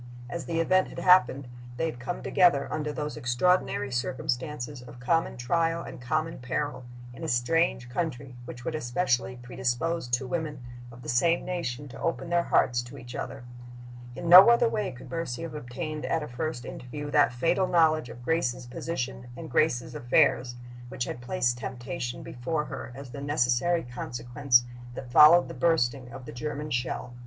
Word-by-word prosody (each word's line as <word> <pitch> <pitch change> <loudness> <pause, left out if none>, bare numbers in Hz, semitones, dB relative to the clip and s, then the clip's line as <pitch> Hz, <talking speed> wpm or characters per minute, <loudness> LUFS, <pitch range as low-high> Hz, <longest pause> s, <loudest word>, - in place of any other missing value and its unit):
As 170 - -4
the 165 -1 -1
event 185 +3 +3
had - - -11
happened, 140 -7 +4 0.3
they 165 - 0
had 155 -7 -4
come 130 +8 -5
together, 170 -6 +4
under 150 -1 -2
those 150 0 -4
extraordinary 130 +2 +1
circumstances 130 +2 -3
of 120 0 -12
common 165 +3 0
trial 165 +7 0
and - - -9
common 155 +6 -1
peril, 130 +1 -3 0.3
in - - -10
a - - -2
strange 125 +1 +1
country, 130 -2 -4
which 120 0 -9
would 165 - -2
especially 125 -3 0
predispose 130 +5 -2
two 120 +2 0
women 150 -3 -4 0.3
of 120 +1 -13
the - - -9
same 165 +8 +2
nation 145 -7 -3
to - - -10
open 170 +1 -2
their 175 0 +4
hearts 120 -7 +2
to 120 +3 -11
each 120 -1 -10
other. 135 0 -6 0.7
In 170 - -5
no 185 +6 +11
other 235 0 +5
way 210 -3 -1
could 125 -1 -12
Mercy 165 -5 -3
have 165 - -6
obtained 150 +3 -5
at 165 -2 0
a - - -6
first 125 0 -4
interview 145 +4 -7
that 145 -3 +4
fatal 165 +9 +1
knowledge 155 -6 +3
of 120 +1 -10
Grace's 130 -5 0
position 125 -1 -4
and 160 -1 -8
Grace's 125 -6 +1
affairs 120 0 +2 0.3
which 125 - -3
had 120 - -5
placed 125 -3 0
temptation 120 0 -5
before 150 +5 -3
her 130 - -7
as 135 -2 -9
the 140 - -7
necessary 145 +4 +1
consequence 120 +1 +1 0.3
that 125 -1 -8
followed 155 +6 +8
the - - -7
bursting 135 -6 +1
of 125 +1 -9
the - - -8
German 150 +3 -4
shell. 125 0 -2
135 Hz, 175 wpm, -28 LUFS, 120-165 Hz, 0.7 s, no